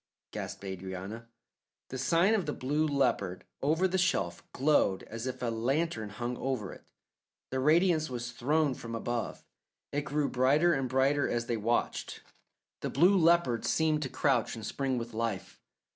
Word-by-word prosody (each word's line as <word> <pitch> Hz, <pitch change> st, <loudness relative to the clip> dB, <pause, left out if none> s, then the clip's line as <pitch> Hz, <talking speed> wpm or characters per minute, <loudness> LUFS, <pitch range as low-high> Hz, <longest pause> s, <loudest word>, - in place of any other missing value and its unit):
gasped -, -, -6 dB
Adrianna. 95 Hz, +4 st, -6 dB, 0.6 s
The 130 Hz, -, -5 dB
sign 170 Hz, -, +3 dB
of 195 Hz, -8 st, 0 dB
the 150 Hz, -, -1 dB
Blue 150 Hz, +4 st, 0 dB
Leopard 100 Hz, -10 st, 0 dB, 0.2 s
over 160 Hz, +7 st, +2 dB
the 190 Hz, +1 st, 0 dB
shelf 95 Hz, -, 0 dB
glowed 130 Hz, -9 st, +2 dB
as 115 Hz, +3 st, -6 dB
if 125 Hz, -1 st, -5 dB
a 120 Hz, -, +1 dB
lantern 120 Hz, 0 st, -1 dB
hung 120 Hz, +4 st, -4 dB
over 125 Hz, -7 st, -3 dB
it. -, -, -15 dB, 0.7 s
The 130 Hz, -, -1 dB
radiance 155 Hz, +2 st, +3 dB
was 120 Hz, -1 st, -4 dB
thrown 145 Hz, +4 st, +1 dB
from 115 Hz, -2 st, -7 dB
above. 120 Hz, 0 st, -3 dB, 0.5 s
It 145 Hz, -, 0 dB
grew 145 Hz, 0 st, -1 dB
brighter 145 Hz, +7 st, +3 dB
and 135 Hz, -4 st, -1 dB
brighter 135 Hz, +3 st, +2 dB
as 120 Hz, 0 st, -1 dB
they 120 Hz, -, -1 dB
watched. 115 Hz, +3 st, -1 dB, 0.6 s
The -, -, -3 dB
Blue 175 Hz, +8 st, +5 dB
Leopard 165 Hz, -9 st, +3 dB
seemed 155 Hz, -1 st, +2 dB
to 135 Hz, -, -2 dB
crouch 135 Hz, -2 st, +1 dB
and 110 Hz, -2 st, -7 dB
spring 135 Hz, +1 st, -1 dB
with 115 Hz, 0 st, -5 dB
life. 110 Hz, -4 st, -3 dB
130 Hz, 160 wpm, -30 LUFS, 115-155 Hz, 0.7 s, Blue